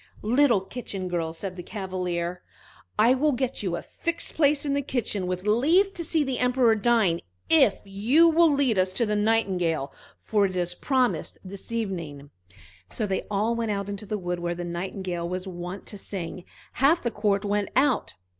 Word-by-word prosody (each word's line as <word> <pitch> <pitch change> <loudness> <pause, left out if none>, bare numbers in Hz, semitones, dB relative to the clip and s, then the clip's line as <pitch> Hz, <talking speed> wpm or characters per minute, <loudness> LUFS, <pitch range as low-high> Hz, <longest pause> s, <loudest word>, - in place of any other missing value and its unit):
"Little 240 -1 +4
Kitchen 195 -2 -6
girl," 170 -2 -2
said 180 +3 -5
the 180 - -6
Cavalier, 180 -3 -3 0.6
"I 230 +4 +5
will 290 +3 +2
get 255 0 -2
you 185 -4 -1
a - - -5
fixed 335 0 -3
place 295 -1 +3
in 280 - 0
the 280 - +1
kitchen, 225 -8 -2
with 180 0 -3
leave 320 - +3
to 340 - -4
see 320 -1 +1
the 265 -3 -2
Emperor 250 -2 +4
dine, 220 -6 +2 0.3
if 275 -11 +6
you 225 +12 +4
will 330 0 +5
lead 270 -8 +2
us 185 0 +1
to 235 - +1
the 210 -1 0
Nightingale, 185 -9 +1 0.3
for 205 -2 +2
it 185 - -7
is 175 -1 -1
promised 255 +5 0
for 190 - -12
this 200 +3 -9
evening." 170 -11 -4 0.6
So 220 - -3
they 195 -2 -1
all 210 +3 +1
went 230 -1 -2
out 200 -1 -2
into 200 +1 -6
the 215 0 -2
wood 180 -2 -3
where 175 0 -2
the 175 0 -5
Nightingale 175 0 -4
was 185 +1 -4
wont 180 +1 -6
to 205 - -6
sing; 185 -2 -6 0.3
half 290 +6 +3
the 235 - 0
court 205 -1 0
went 205 -1 0
out. 265 -2 +2
205 Hz, 190 wpm, -26 LUFS, 180-250 Hz, 0.6 s, if